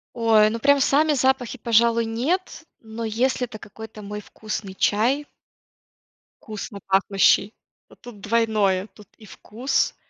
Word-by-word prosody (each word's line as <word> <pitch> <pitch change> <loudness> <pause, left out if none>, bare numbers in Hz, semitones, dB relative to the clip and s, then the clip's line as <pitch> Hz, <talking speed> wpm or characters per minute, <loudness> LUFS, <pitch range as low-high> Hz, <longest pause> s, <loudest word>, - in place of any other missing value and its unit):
Ой, 220 -2 +4
ну 230 +1 -4
прям 285 +4 +4
сами 295 +3 +3
запахи, 265 -2 0
пожалуй, 230 0 +2
нет, 300 +11 -2 0.2
но 225 +1 -8
если 245 +3 0
это 225 -3 -11
какой-то 215 +1 -11
мой 210 +1 -7
вкусный 210 -2 -7
чай 240 +9 +1 1.1
вкусно 215 -1 -8
пахнущий, 195 +1 +3 0.4
то - - -17
тут 235 -4 -13
двойное: 210 -3 +1
тут 210 -1 -18
и 220 - -15
вкус, 225 +7 -2
225 Hz, 130 wpm, -23 LUFS, 210-250 Hz, 1.1 s, Ой